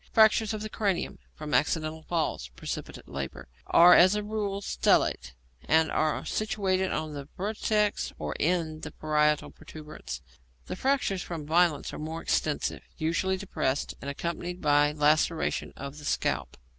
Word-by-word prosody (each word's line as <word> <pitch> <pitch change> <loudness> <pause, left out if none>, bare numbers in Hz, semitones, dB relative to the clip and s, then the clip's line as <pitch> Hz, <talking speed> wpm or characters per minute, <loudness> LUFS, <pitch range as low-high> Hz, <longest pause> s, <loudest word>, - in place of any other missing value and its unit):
Fractures 220 0 +5
of 215 -1 -4
the - - -3
cranium 200 -4 -1 0.2
from 150 -1 -6
accidental 155 +1 +1
falls 155 - -2
(precipitate - - -6
labour) 70 -1 -6 0.2
are 175 +1 +8
as 185 +3 +7
a 210 - -1
rule 205 -2 -2
stellate, 60 - +1 0.3
and 160 0 +3
are 155 -1 0
situated 190 -3 0
on 155 -1 -3
the 140 -1 -7
vertex 210 +1 0
or - - -4
in 160 -2 0
the - - -6
parietal 150 -1 +1
protuberance. 155 - -9 0.4
The - - -5
fractures 255 -6 0
from 165 -5 -6
violence 160 -1 +2
are - - -6
more 160 +2 -5
extensive, 155 -2 0 0.2
usually 170 +4 0
depressed, 145 -8 -2
and 140 - -5
accompanied 170 +4 -4
by 145 -1 +4
laceration 155 +2 +1
of 140 +2 -7
the 145 - -10
scalp. - - -1
160 Hz, 145 wpm, -28 LUFS, 150-190 Hz, 0.4 s, are